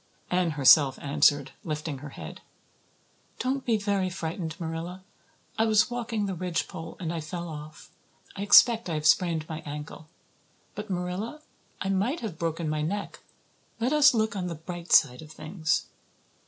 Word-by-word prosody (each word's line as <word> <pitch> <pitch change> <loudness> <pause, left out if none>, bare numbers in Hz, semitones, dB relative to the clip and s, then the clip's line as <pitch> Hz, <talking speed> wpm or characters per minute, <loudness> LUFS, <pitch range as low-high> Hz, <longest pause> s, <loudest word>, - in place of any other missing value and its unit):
Anne 180 -1 +2
herself 135 0 +6
answered, 145 -1 +2
lifting 155 -3 -4
her 145 +1 -8
head. - - -9 1.0
"Don't 265 +1 -1
be 230 -3 +2
very 200 -2 0
frightened, 165 -2 -5
Marilla. 170 +2 -5 0.6
I 225 - +4
was 215 +2 +3
walking 230 -3 -2
the 195 - -2
ridgepole 165 -2 -4
and 170 -2 -3
I 165 - -3
fell 170 +3 -5
off. 155 -1 -10 0.4
I 200 - -5
expect 225 +1 +6
I 165 - -1
have 150 0 -3
sprained 160 -1 +3
my 160 -1 -5
ankle. 150 +1 -8 0.6
But, 210 +1 -7
Marilla, 190 +11 -4 0.4
I 190 - -1
might 205 - 0
have 205 -9 -6
broken 165 -1 -2
my 155 0 -1
neck. 200 +7 -3 0.6
Let 245 +5 +1
us 295 -3 +6
look 220 -1 +1
on 185 -2 -2
the 170 - -4
bright 170 +2 -8
side 125 -3 +5
of 155 -1 -12
things." 160 +1 -1
175 Hz, 160 wpm, -27 LUFS, 155-205 Hz, 1.0 s, herself